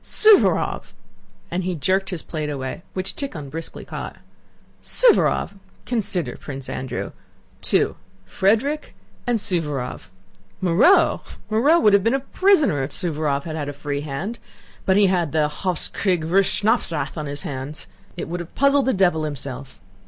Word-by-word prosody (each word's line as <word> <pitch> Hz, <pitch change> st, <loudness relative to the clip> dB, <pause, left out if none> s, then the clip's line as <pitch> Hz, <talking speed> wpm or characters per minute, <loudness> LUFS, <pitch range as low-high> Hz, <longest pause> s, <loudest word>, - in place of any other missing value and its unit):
"Suvórov!" 430 Hz, -2 st, +3 dB, 0.6 s
And 180 Hz, +2 st, -1 dB
he 180 Hz, 0 st, -2 dB
jerked 190 Hz, +6 st, 0 dB
away -, -, -2 dB
his 165 Hz, -, -6 dB
plate, 150 Hz, -3 st, -4 dB
which 185 Hz, 0 st, -2 dB
Tíkhon 165 Hz, -, -5 dB
briskly 165 Hz, +1 st, -7 dB
caught. -, -, -6 dB, 0.7 s
"Suvórov!... 455 Hz, -, +3 dB, 0.3 s
Consider, 190 Hz, -, 0 dB
Prince 135 Hz, -2 st, -8 dB
Andrew. 130 Hz, -, -4 dB, 0.5 s
Two... -, -, +2 dB, 0.3 s
Frederick 225 Hz, -, 0 dB, 0.3 s
and 240 Hz, -1 st, +2 dB
Suvórov; 155 Hz, -, -3 dB, 0.5 s
Moreau!... 185 Hz, -, +4 dB, 0.3 s
Moreau 285 Hz, +10 st, +4 dB
would 210 Hz, -9 st, +4 dB
have 200 Hz, -1 st, +5 dB
been 230 Hz, +4 st, +2 dB
a -, -, +1 dB
prisoner 295 Hz, -, +2 dB
if 135 Hz, +2 st, -3 dB
Suvórov 150 Hz, -5 st, 0 dB
had 160 Hz, -2 st, -5 dB
had 145 Hz, -2 st, -3 dB
a -, -, -5 dB
free 145 Hz, 0 st, -4 dB
hand; 155 Hz, +11 st, -5 dB, 0.5 s
but 190 Hz, 0 st, +4 dB
he 205 Hz, -, +6 dB
had 175 Hz, -5 st, +1 dB
the 155 Hz, -2 st, +3 dB
Hofs 175 Hz, +3 st, -2 dB
kriegs 180 Hz, -5 st, 0 dB
wurst 190 Hz, +3 st, +3 dB
schnapps 220 Hz, -2 st, +2 dB
Rath 155 Hz, -, -3 dB
on 155 Hz, -3 st, -4 dB
his 145 Hz, 0 st, -5 dB
hands. 140 Hz, +2 st, -5 dB, 0.3 s
It -, -, -4 dB
would 175 Hz, +2 st, -4 dB
have 175 Hz, -1 st, -9 dB
puzzled 280 Hz, 0 st, +3 dB
the 265 Hz, -, +2 dB
devil 175 Hz, -5 st, +2 dB
himself! 135 Hz, -3 st, -6 dB
175 Hz, 155 wpm, -22 LUFS, 145-210 Hz, 0.7 s, he